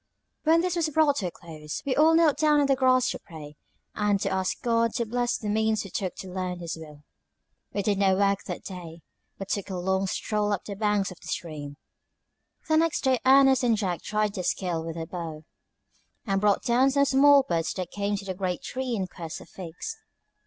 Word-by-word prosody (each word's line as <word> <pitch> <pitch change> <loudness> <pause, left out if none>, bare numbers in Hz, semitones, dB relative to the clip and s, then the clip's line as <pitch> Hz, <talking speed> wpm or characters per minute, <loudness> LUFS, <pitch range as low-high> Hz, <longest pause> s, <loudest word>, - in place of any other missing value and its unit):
When 325 +2 +5
this 360 0 -1
was 330 -2 +1
brought 300 -2 +3
to 190 - -1
a - - -5
close, 155 -3 -8
we 265 -2 0
all 320 +2 +5
knelt 325 -3 +4
down 300 -1 +4
on 285 - +3
the 275 -1 +3
grass 255 -1 +3
to - - -5
pray, 155 -5 -11 0.4
and 205 -1 +1
to - - -1
ask 190 -1 -1
God 230 -1 +1
to 235 - 0
bless 240 +2 -1
the 215 - -6
means 220 +1 +1
we 195 - -10
took 185 -3 -3
to 190 - -8
learn 185 -1 -3
His 170 -1 -5
will. 150 -2 -12 0.7
We 200 - -2
did 200 0 +1
no 190 -1 +4
work 200 0 +2
that - - -5
day, 170 -3 -9 0.4
but 195 - -6
took 200 -1 -2
a 190 - -4
long 190 +2 0
stroll 210 +2 -1
up 195 - -3
the 200 - -5
banks 205 -2 0
of 180 - -12
the - - -13
stream. 145 -4 -5 0.9
The 315 0 +3
next 330 0 +2
day 260 -2 +2
Ernest 270 0 +6
and 235 -3 +2
Jack 185 -5 -2
tried 210 -1 -1
their 185 - -4
skill 175 -3 -1
with 165 0 -5
the 165 -1 -4
bow, 160 -3 -6 0.8
and 195 -3 0
brought 205 -1 +2
down 250 +3 +3
some 280 +1 +3
small 280 +1 +6
birds 165 -7 -1
that 185 -2 -5
came 205 0 -1
to 200 - -8
the 190 - -3
great 180 -1 -3
tree 255 -2 -3
in 195 -3 -1
quest 170 -2 -7
of - - -14
figs. 185 - -7
205 Hz, 220 wpm, -26 LUFS, 180-260 Hz, 0.9 s, Ernest